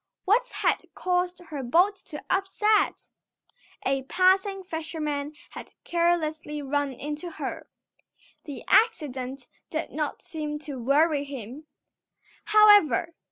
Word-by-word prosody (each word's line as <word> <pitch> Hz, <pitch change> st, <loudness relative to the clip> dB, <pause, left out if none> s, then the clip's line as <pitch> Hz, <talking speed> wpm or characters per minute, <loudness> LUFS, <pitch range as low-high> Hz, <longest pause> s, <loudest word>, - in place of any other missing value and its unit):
What 465 Hz, +6 st, +3 dB
had -, -, 0 dB
caused 360 Hz, 0 st, 0 dB
her 290 Hz, -3 st, -4 dB
boat 350 Hz, +11 st, +3 dB
to 300 Hz, -4 st, -8 dB
upset? 405 Hz, +3 st, +1 dB, 0.8 s
A 270 Hz, 0 st, +1 dB
passing 380 Hz, +6 st, +2 dB
fisherman 305 Hz, -4 st, -4 dB, 0.2 s
had -, -, -10 dB
carelessly 315 Hz, -3 st, 0 dB
run 285 Hz, 0 st, -1 dB
into 295 Hz, +6 st, -5 dB
her. -, -, -6 dB, 0.8 s
The 290 Hz, -4 st, -7 dB
accident 270 Hz, -, +1 dB, 0.2 s
did 315 Hz, +1 st, -3 dB
not 300 Hz, -1 st, -3 dB
seem 300 Hz, -2 st, -4 dB
to 280 Hz, -4 st, -6 dB
worry 285 Hz, +4 st, +2 dB
him, 275 Hz, +2 st, -8 dB, 0.8 s
however. 410 Hz, -, +5 dB
310 Hz, 110 wpm, -26 LUFS, 285-365 Hz, 0.8 s, however